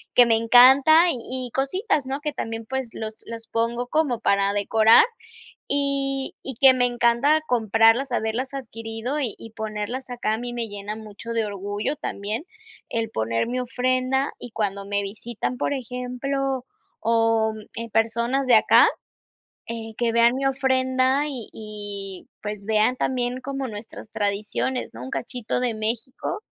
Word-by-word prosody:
que 245 Hz, -, +8 dB
me 230 Hz, -1 st, +3 dB
encanta, 265 Hz, +8 st, +7 dB
y 255 Hz, 0 st, -3 dB
y -, -, -14 dB
cositas, 275 Hz, -, 0 dB
¿no?, 270 Hz, +2 st, -3 dB
que 300 Hz, -1 st, -3 dB
también, 225 Hz, -4 st, -5 dB
pues 265 Hz, -1 st, -3 dB
los 220 Hz, 0 st, -5 dB
las 230 Hz, 0 st, -7 dB
pongo 235 Hz, +2 st, -1 dB
como 285 Hz, -5 st, 0 dB
para 200 Hz, -2 st, +2 dB
decorar 220 Hz, -, +6 dB, 0.6 s
y 275 Hz, -1 st, 0 dB
y 270 Hz, -, -4 dB
que 265 Hz, -1 st, +8 dB
me 250 Hz, -1 st, +2 dB
encanta 245 Hz, +5 st, +3 dB
comprarlas, 225 Hz, +3 st, +3 dB
haberlas 235 Hz, +4 st, -2 dB
adquirido 225 Hz, +1 st, -4 dB
y 250 Hz, -7 st, -2 dB
y 225 Hz, -, -10 dB
ponerlas 220 Hz, +4 st, -5 dB
acá. 240 Hz, -3 st, -1 dB
A -, -, -5 dB
mí 245 Hz, 0 st, -5 dB
me 235 Hz, -1 st, -3 dB
llena 205 Hz, +1 st, -6 dB
mucho 220 Hz, +1 st, -9 dB
de 225 Hz, -1 st, +1 dB
orgullo 205 Hz, +5 st, -3 dB
también 215 Hz, +8 st, -4 dB, 0.4 s
el 225 Hz, -1 st, -2 dB
poner 115 Hz, -, -1 dB
mi 250 Hz, +2 st, -2 dB
ofrenda 255 Hz, +2 st, 0 dB
y 245 Hz, -, -9 dB
cuando 200 Hz, -3 st, -2 dB
me 205 Hz, 0 st, -1 dB
visitan, 225 Hz, +4 st, -4 dB
por 285 Hz, -, -1 dB
ejemplo, 260 Hz, +1 st, -3 dB, 0.4 s
o 225 Hz, -1 st, +2 dB, 0.3 s
eh, 230 Hz, 0 st, -4 dB
personas 235 Hz, +5 st, +1 dB
de 245 Hz, -, +7 dB
acá, 215 Hz, -, +6 dB, 0.8 s
eh, 225 Hz, -1 st, -6 dB
que 235 Hz, -1 st, +1 dB
vean 235 Hz, +1 st, +4 dB
mi 270 Hz, +1 st, -2 dB
ofrenda 260 Hz, 0 st, +2 dB
y 255 Hz, -6 st, -6 dB
y 205 Hz, -3 st, -7 dB, 0.2 s
pues, 210 Hz, -1 st, -5 dB
vean 220 Hz, +3 st, +2 dB
también 250 Hz, -1 st, -1 dB
como 275 Hz, 0 st, -4 dB
nuestras 215 Hz, -1 st, -9 dB
tradiciones, 210 Hz, +4 st, -2 dB
¿no? 115 Hz, +2 st, -8 dB
Un 130 Hz, -, -7 dB
cachito 225 Hz, -, -3 dB
de 245 Hz, -3 st, 0 dB
México. 230 Hz, -, -3 dB
235 Hz, 155 wpm, -24 LUFS, 220-260 Hz, 0.8 s, que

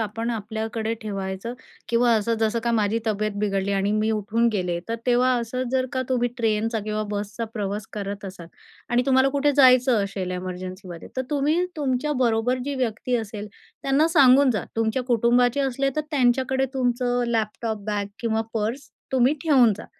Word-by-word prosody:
आपण 225 Hz, +2 st, -2 dB
आपल्याकडे 220 Hz, 0 st, -3 dB
ठेवायचं 195 Hz, +1 st, -4 dB, 0.3 s
किंवा 235 Hz, 0 st, +3 dB
असं, 225 Hz, +1 st, +1 dB
जसं 220 Hz, +1 st, +1 dB
का 235 Hz, -, +1 dB
माझी 215 Hz, 0 st, +1 dB
तब्येत 215 Hz, 0 st, 0 dB
बिघडली 200 Hz, -1 st, 0 dB
आणि 195 Hz, +1 st, +1 dB
मी 215 Hz, +1 st, +1 dB
उठून 220 Hz, +2 st, +1 dB
गेले. 180 Hz, -3 st, -1 dB
तर 230 Hz, -, -1 dB
तेव्हा 250 Hz, +1 st, +3 dB
असं 255 Hz, +2 st, -3 dB
जर 260 Hz, 0 st, +1 dB
का 260 Hz, 0 st, 0 dB
तुम्ही 245 Hz, -1 st, +1 dB
ट्रेनचा 225 Hz, -1 st, 0 dB
किंवा 215 Hz, 0 st, -2 dB
बसचा 205 Hz, +3 st, -3 dB
प्रवास 205 Hz, -1 st, -3 dB
करत 200 Hz, -1 st, -5 dB
असाल 185 Hz, -3 st, -8 dB, 0.4 s
आणि 245 Hz, +1 st, +3 dB
तुम्हाला 265 Hz, 0 st, +4 dB
कुठे 285 Hz, +1 st, +1 dB
जायचं 255 Hz, -4 st, +5 dB
असेल 195 Hz, -2 st, -4 dB
एमर्जन्सीमध्ये 185 Hz, -1 st, -6 dB
तर 260 Hz, -, 0 dB
तुम्ही 300 Hz, +5 st, +1 dB
तुमच्याबरोबर 255 Hz, -4 st, 0 dB
जी 285 Hz, 0 st, -3 dB
व्यक्ती 245 Hz, 0 st, -1 dB
असेल 210 Hz, -2 st, -5 dB, 0.3 s
त्यांना 280 Hz, +4 st, +3 dB
सांगूनजा. 260 Hz, -, +5 dB
तुमच्या 225 Hz, +3 st, 0 dB
कुटुंबाचे 245 Hz, +2 st, +2 dB
असले 275 Hz, 0 st, 0 dB
तर -, -, +2 dB
त्यांच्याकडे 265 Hz, -1 st, +2 dB
तुमचं 245 Hz, -1 st, 0 dB
लॅपटॉप 220 Hz, -2 st, -2 dB
बॅग 205 Hz, -1 st, -1 dB
किंवा 225 Hz, -1 st, 0 dB
पर्स 225 Hz, +6 st, -2 dB, 0.2 s
तुम्ही 260 Hz, +3 st, +4 dB
ठेवून 260 Hz, -9 st, +5 dB
जा. -, -, -9 dB
230 Hz, 160 wpm, -24 LUFS, 210-255 Hz, 0.4 s, जायचं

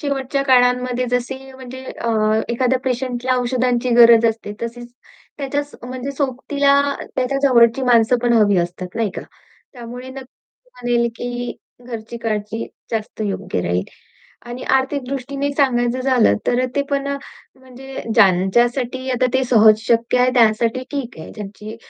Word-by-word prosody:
शेवटच्या 275 Hz, -1 st, -1 dB
काळांमध्ये 250 Hz, -1 st, +2 dB
जसे 250 Hz, +1 st, -1 dB, 0.2 s
म्हणजे 260 Hz, 0 st, -10 dB
अ, 235 Hz, -2 st, -4 dB, 0.4 s
एखाद्या 255 Hz, +2 st, +1 dB
पेशंटला 255 Hz, 0 st, -1 dB
औषधांची 250 Hz, 0 st, 0 dB
गरज 230 Hz, -1 st, +8 dB
असते, 220 Hz, -2 st, -8 dB
तशीच 240 Hz, +1 st, -6 dB, 0.5 s
त्याच्या 285 Hz, +1 st, -1 dB, 0.3 s
म्हणजे 255 Hz, +2 st, -5 dB
सोबतीला 280 Hz, +1 st, +2 dB, 0.4 s
त्याच्या 260 Hz, +2 st, 0 dB
जवळची 240 Hz, -1 st, +4 dB
माणसं 245 Hz, -1 st, +4 dB
पण 240 Hz, -1 st, +2 dB
हवी 210 Hz, -4 st, +4 dB
असतात, 175 Hz, +1 st, -3 dB
नाही 225 Hz, -3 st, -1 dB
का? -, -, -5 dB, 0.5 s
त्यामुळे 245 Hz, 0 st, -9 dB
नक्की 270 Hz, -, -14 dB
म्हणेल 240 Hz, -1 st, +1 dB
की 245 Hz, 0 st, -4 dB, 0.3 s
घरची 230 Hz, -1 st, -7 dB
काळजी 220 Hz, 0 st, -3 dB, 0.2 s
जास्त 220 Hz, -1 st, -4 dB
योग्य 190 Hz, -, -3 dB
राहील 90 Hz, +1 st, -1 dB, 0.6 s
आणि 240 Hz, +1 st, -7 dB
आर्थिक 265 Hz, +1 st, -1 dB
दृष्टीने 275 Hz, +1 st, -3 dB
सांगायचं 250 Hz, -3 st, +1 dB
झालं 255 Hz, -, +3 dB
तर 245 Hz, -, +2 dB
अ, -, -, +1 dB
ते 280 Hz, -, +3 dB
पण 280 Hz, 0 st, -1 dB
अ, 280 Hz, -, -1 dB, 0.4 s
म्हणजे 260 Hz, +1 st, -9 dB
ज्यांच्यासाठी 240 Hz, +6 st, +2 dB
आता 255 Hz, 0 st, +2 dB
ते 260 Hz, -, +3 dB
सहज 220 Hz, -3 st, +5 dB
शक्य 235 Hz, +1 st, +2 dB
आहे, 250 Hz, 0 st, +4 dB
त्यांसाठी 230 Hz, +1 st, +3 dB
ठीक 265 Hz, -, -5 dB
आहे, 160 Hz, -, -9 dB
ज्यांची 210 Hz, +1 st, -8 dB
245 Hz, 140 wpm, -19 LUFS, 230-260 Hz, 0.6 s, गरज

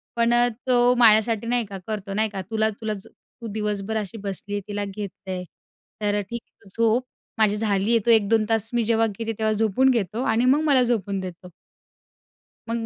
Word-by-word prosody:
पण 235 Hz, 0 st, +2 dB
अ, 240 Hz, 0 st, +4 dB, 0.2 s
तो 245 Hz, -1 st, +4 dB
माझ्यासाठी 225 Hz, -1 st, +4 dB
नाही 240 Hz, -1 st, +1 dB
का 195 Hz, -, -6 dB
करतो 205 Hz, -2 st, -4 dB
नाही 215 Hz, +2 st, +1 dB
का, 195 Hz, -2 st, -5 dB
"तुला, 220 Hz, +2 st, 0 dB
तुला 220 Hz, 0 st, -4 dB
ज 195 Hz, -2 st, -9 dB
तू 235 Hz, -, -14 dB
दिवसभर 210 Hz, 0 st, -2 dB
अशी 215 Hz, +1 st, -5 dB
बसली 200 Hz, 0 st, -5 dB
आहे, 205 Hz, -, -1 dB
तिला 205 Hz, 0 st, -3 dB
घेत 200 Hz, 0 st, -5 dB, 0.2 s
आहे. 185 Hz, -1 st, -3 dB, 0.6 s
तर 205 Hz, -1 st, +1 dB
अ, -, -, -1 dB
ठीक 235 Hz, +4 st, -6 dB
आहे, -, -, -47 dB
तू 195 Hz, -, -17 dB
झोप. 230 Hz, +3 st, +3 dB, 0.3 s
माझी 215 Hz, -2 st, +3 dB
झाली 210 Hz, -1 st, 0 dB
आहे." 230 Hz, -, +5 dB
तो 235 Hz, -, +5 dB
1-2 220 Hz, 0 st, +3 dB
तास 225 Hz, -1 st, +1 dB
मी 240 Hz, -1 st, +2 dB
जेव्हा 225 Hz, 0 st, +2 dB
घेते 225 Hz, +2 st, -4 dB
तेव्हा 220 Hz, 0 st, +1 dB
झोपून 220 Hz, +4 st, +2 dB
घेतो 230 Hz, -1 st, 0 dB
आणि 230 Hz, 0 st, +2 dB
मग 275 Hz, +4 st, +4 dB
मला 260 Hz, -3 st, +5 dB
झोपून 205 Hz, -5 st, -1 dB
देतो. 180 Hz, -1 st, -8 dB, 1.2 s
मग 230 Hz, 0 st, -2 dB
220 Hz, 205 wpm, -24 LUFS, 205-230 Hz, 1.2 s, आहे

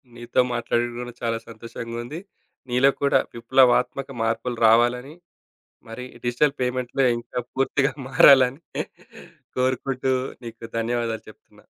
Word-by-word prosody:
నీతో 120 Hz, +1 st, -2 dB
మాట్లాడడం 120 Hz, 0 st, -1 dB
కూడా 120 Hz, 0 st, -7 dB
చాలా 115 Hz, -1 st, 0 dB
సంతోషంగా 115 Hz, +1 st, -8 dB
ఉంది. 150 Hz, +7 st, -7 dB, 0.5 s
నీలో 125 Hz, +3 st, +4 dB
కూడా 140 Hz, -, +4 dB, 0.2 s
విప్లవాత్మక 125 Hz, +2 st, +2 dB
మార్పులు 115 Hz, +2 st, -2 dB
రావాలని. 120 Hz, +5 st, +3 dB, 0.7 s
మరి 120 Hz, +3 st, -7 dB, 0.2 s
డిజిటల్ 125 Hz, +4 st, +2 dB
పేమెంట్‌లో 125 Hz, +1 st, -1 dB
ఇంకా 120 Hz, +1 st, -5 dB
పూర్తిగా 135 Hz, +1 st, +1 dB, 0.2 s
మారాలని 135 Hz, +1 st, +6 dB, 1.0 s
కోరుకుంటూ 130 Hz, +1 st, 0 dB, 0.3 s
నీకు 115 Hz, 0 st, -10 dB
ధన్యవాదాలు 115 Hz, -1 st, -2 dB
చెప్తున్నా. 110 Hz, -, -20 dB
125 Hz, 105 wpm, -24 LUFS, 115-130 Hz, 1.0 s, మారాలని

